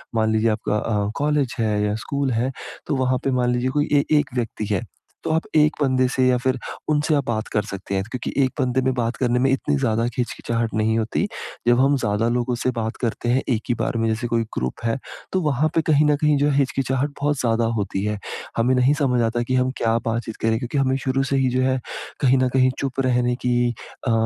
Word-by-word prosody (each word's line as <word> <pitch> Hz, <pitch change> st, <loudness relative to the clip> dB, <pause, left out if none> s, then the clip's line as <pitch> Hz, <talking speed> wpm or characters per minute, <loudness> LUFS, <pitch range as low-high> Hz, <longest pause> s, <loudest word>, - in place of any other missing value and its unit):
मान 110 Hz, -1 st, +2 dB
लीजिए 110 Hz, +1 st, +2 dB
आपका 105 Hz, -1 st, -1 dB
अ, 105 Hz, -1 st, -1 dB
कॉलेज 145 Hz, -3 st, 0 dB
है, 110 Hz, -1 st, +1 dB
या 105 Hz, 0 st, 0 dB
स्कूल 140 Hz, +4 st, -2 dB
है 120 Hz, +3 st, 0 dB, 0.4 s
तो 150 Hz, -, 0 dB
वहाँ 130 Hz, -1 st, +1 dB
पे 135 Hz, -, +1 dB
मान 125 Hz, -1 st, +1 dB
लीजिए 125 Hz, +1 st, 0 dB
कोई 145 Hz, +2 st, +1 dB
ए 140 Hz, -1 st, +5 dB, 0.2 s
एक 145 Hz, -, -2 dB
व्यक्ति 115 Hz, -3 st, -2 dB
है। 100 Hz, -, +1 dB, 0.4 s
तो -, -, -2 dB
आप 160 Hz, +1 st, +2 dB
एक 150 Hz, 0 st, +5 dB
बन्दे 130 Hz, -2 st, +3 dB
से 130 Hz, 0 st, +1 dB
या 125 Hz, -1 st, +4 dB
फिर 130 Hz, -1 st, +1 dB, 0.3 s
उनसे 150 Hz, +1 st, +2 dB
आप 145 Hz, -, 0 dB
बात 110 Hz, -2 st, -2 dB
कर 105 Hz, -, +2 dB
सकते 100 Hz, -1 st, -5 dB
हैं, 95 Hz, -, 0 dB
क्योंकि 125 Hz, -, -4 dB
एक 130 Hz, -, +1 dB
बन्दे 130 Hz, -1 st, +1 dB
में 130 Hz, 0 st, +1 dB
बात 120 Hz, -1 st, -1 dB
करने 125 Hz, -1 st, +1 dB
में 135 Hz, +2 st, +3 dB
इतनी 140 Hz, +2 st, +1 dB
ज़्यादा 115 Hz, -4 st, +1 dB
हिचकिचाहट 115 Hz, -2 st, -2 dB
नहीं 110 Hz, +1 st, +1 dB
होती। 115 Hz, -, -1 dB, 0.4 s
जब 120 Hz, 0 st, +5 dB
हम 140 Hz, +2 st, +4 dB
ज़्यादा 115 Hz, -1 st, 0 dB
लोगों 120 Hz, +1 st, 0 dB
से 130 Hz, -, +2 dB
बात 110 Hz, 0 st, -2 dB
करते 120 Hz, 0 st, -1 dB
हैं 130 Hz, +2 st, +3 dB
एक 115 Hz, -4 st, +1 dB
ही -, -, +4 dB
बार 115 Hz, -, -1 dB
में 115 Hz, 0 st, +1 dB
जैसे 115 Hz, +2 st, -1 dB
कोई 115 Hz, -1 st, +1 dB
ग्रुप 65 Hz, -, -3 dB
है 115 Hz, +2 st, +1 dB, 0.4 s
तो 190 Hz, -, +2 dB
वहाँ 150 Hz, -1 st, +1 dB
पे 165 Hz, -, +4 dB
कहीं 150 Hz, 0 st, +5 dB
न 150 Hz, 0 st, +4 dB
कहीं 150 Hz, -1 st, +4 dB
जो 145 Hz, +1 st, +2 dB
है 140 Hz, -, +1 dB
हिचकिचाहट 135 Hz, 0 st, 0 dB
बहुत 145 Hz, -1 st, +1 dB
ज़्यादा 115 Hz, -1 st, +1 dB
होती 100 Hz, -1 st, -2 dB
है। 105 Hz, 0 st, -1 dB, 0.4 s
हमें 120 Hz, +3 st, +3 dB
नहीं 125 Hz, +3 st, +4 dB
समझ 125 Hz, -4 st, +2 dB
आता 115 Hz, +1 st, 0 dB
कि 130 Hz, +2 st, -1 dB
हम 130 Hz, 0 st, +2 dB
क्या 115 Hz, 0 st, +2 dB
बातचीत 115 Hz, 0 st, -2 dB
करें, 110 Hz, 0 st, +2 dB
क्योंकि 125 Hz, +4 st, -3 dB
हमें 135 Hz, -1 st, +2 dB
शुरू 135 Hz, 0 st, 0 dB
से 135 Hz, 0 st, -1 dB
ही 130 Hz, -1 st, +2 dB
जो 125 Hz, +1 st, 0 dB
है 130 Hz, 0 st, +1 dB, 0.4 s
कहीं 135 Hz, -1 st, +4 dB
न 130 Hz, 0 st, +2 dB
कहीं 130 Hz, -1 st, +4 dB
चुप 135 Hz, -1 st, -3 dB
रहने 125 Hz, -1 st, +1 dB
की 120 Hz, -1 st, +2 dB, 0.3 s
अ, -, -, +3 dB
125 Hz, 235 wpm, -22 LUFS, 115-135 Hz, 0.4 s, ए